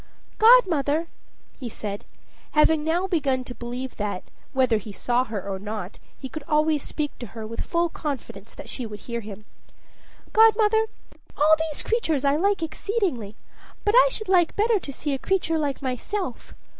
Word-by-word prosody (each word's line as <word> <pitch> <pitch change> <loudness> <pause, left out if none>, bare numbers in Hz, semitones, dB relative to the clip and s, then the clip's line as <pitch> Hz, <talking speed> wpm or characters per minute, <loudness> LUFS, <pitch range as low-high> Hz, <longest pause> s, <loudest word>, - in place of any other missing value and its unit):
"Godmother," 335 - +5 0.5
he 245 - -5
said, 205 -2 -6 0.5
having 305 0 +4
now 335 +4 +1
begun 280 -8 0
to 250 - -8
believe 245 +2 -6
that, 205 -3 -3 0.3
whether 255 -4 +3
he 210 +1 -9
saw 245 +5 0
her 205 -4 -5
or 195 -1 -3
not, 205 -2 -6 0.2
he 265 - -6
could 310 +4 -7
always 305 -1 +2
speak 295 +1 -3
to 240 - -6
her 220 - -5
with 230 +1 -5
full 340 0 +1
confidence 265 - -6
that - - -9
she 255 - -4
would 210 -1 -9
hear 235 -1 -4
him 210 -1 -9 0.9
"Godmother, 440 0 +5 0.5
all 310 +2 +6
these 300 - -3
creatures 320 - 0
I 280 +1 +4
like 390 +2 +1
exceedingly; 315 - -2 0.5
but 415 - +3
I - - +7
should 435 - -4
like 360 -3 +3
better 435 0 +3
to 290 - -7
see 290 +1 -3
a 270 - -2
creature 330 -3 0
like 280 -3 -2
myself. 260 - -4
290 Hz, 170 wpm, -25 LUFS, 235-350 Hz, 0.9 s, I